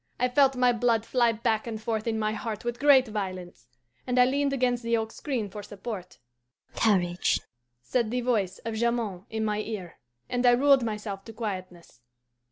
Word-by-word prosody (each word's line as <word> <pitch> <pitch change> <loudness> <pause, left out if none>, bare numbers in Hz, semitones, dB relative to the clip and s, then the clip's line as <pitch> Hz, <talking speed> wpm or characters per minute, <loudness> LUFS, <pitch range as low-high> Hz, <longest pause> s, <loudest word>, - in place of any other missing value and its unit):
I 250 +1 +2
felt 270 +1 +4
my 250 -1 +4
blood 230 -1 +1
fly 240 -2 +3
back 225 0 -1
and 220 -2 -4
forth 220 0 -2
in 225 -1 0
my 215 -1 0
heart 220 0 -5
with 240 0 -3
great 275 -3 +6
violence, 185 - -5 0.4
and 250 0 0
I 250 - +7
leaned 280 +2 +1
against 250 -2 +1
the 230 0 +1
oak 220 0 -3
screen 255 -8 -3
for 205 +2 -8
support. 200 -2 -7 0.6
'Courage,' 180 -5 +2 0.4
said 235 - 0
the 250 +2 -1
voice 215 -7 0
of 225 - -2
Jamond 220 -5 -1
in 220 0 -2
my 210 -1 0
ear, 210 -5 -6 0.3
and 245 0 -1
I 245 -1 +6
ruled 275 +2 +5
myself 210 -3 -4
to 225 - -9
quietness. 185 - -6
225 Hz, 180 wpm, -27 LUFS, 210-245 Hz, 0.6 s, I